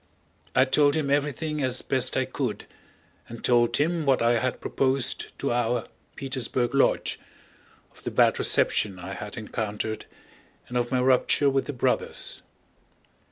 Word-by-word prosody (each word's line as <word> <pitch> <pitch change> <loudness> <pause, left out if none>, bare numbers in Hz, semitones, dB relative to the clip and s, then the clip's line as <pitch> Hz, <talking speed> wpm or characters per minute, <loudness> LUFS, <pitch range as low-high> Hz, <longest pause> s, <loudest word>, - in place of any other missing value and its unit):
I 130 0 +6
told 145 +2 +3
him 145 -3 0
everything 150 +1 -1
as 130 -1 +1
best 130 -1 +1
I 130 - +2
could, 130 -3 -4 0.6
and 115 -1 -9
told 120 -1 +3
him 165 +2 +1
what 135 -3 +3
I 115 0 +3
had 130 +1 -2
proposed 135 -1 -1
to - - -1
our 120 -1 0 0.3
Petersburg 130 -2 -2
lodge, 140 - +2 0.7
of - - -20
the - - -2
bad - - +3
reception 100 -3 +2
I 90 +2 -7
had 105 +1 -7
encountered, 110 0 -4 0.6
and 125 - -8
of 120 -1 0
my 130 -1 +2
rupture 130 +2 +3
with 135 0 0
the 145 - -5
Brothers. 125 - -1
130 Hz, 150 wpm, -26 LUFS, 120-140 Hz, 0.7 s, I